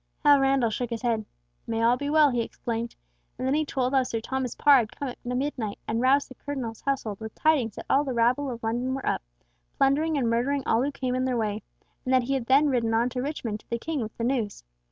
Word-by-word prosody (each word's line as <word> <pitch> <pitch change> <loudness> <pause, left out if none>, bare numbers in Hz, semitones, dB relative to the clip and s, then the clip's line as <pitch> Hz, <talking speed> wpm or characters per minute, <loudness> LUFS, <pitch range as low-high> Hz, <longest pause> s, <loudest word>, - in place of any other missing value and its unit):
Hal 290 -1 +7
Randall 270 -4 +2
shook 240 +2 -2
his 230 +1 -5
head. 225 -3 0 0.4
"May 225 0 -1
all 235 +2 +5
be 285 +3 -3
well," 300 -2 +5
he 240 -1 0
exclaimed, 230 0 -4 0.4
and 255 - -3
then 265 - +2
he 310 +1 +2
told 260 -3 -1
how 265 - +5
Sir 235 -3 -2
Thomas 255 +1 -3
Parr 290 -2 +6
had 220 -3 -2
come 280 - -3
at 245 - -11
midnight 250 -4 -2
and 225 +1 0
roused 270 +3 +3
the - - -11
Cardinal's 255 -5 -5
household 240 -7 -2
with 220 0 -8
tidings 275 -9 +2
that - - -8
all 275 +2 +3
the 275 - -3
rabble 245 +4 +2
of 235 -2 -6
London 245 +4 -1
were 270 - -5
up, - - 0 0.6
plundering 295 +3 +2
and 255 -4 +1
murdering 255 +5 +1
all 225 - +2
who 280 +3 0
came 260 -2 -3
in 255 0 0
their 255 -2 0
way, 215 -1 -1 0.4
and 255 - -2
that 260 -1 +4
he 270 +3 -1
had 260 -3 -2
then 280 +3 +5
ridden 235 -4 +1
on 235 +2 +2
to 250 0 -3
Richmond 250 -7 -3
to - - -25
the 235 - -1
King 310 +5 -3
with 220 -1 -6
the 230 - -3
news. 235 -4 -1
255 Hz, 250 wpm, -26 LUFS, 230-275 Hz, 0.6 s, Hal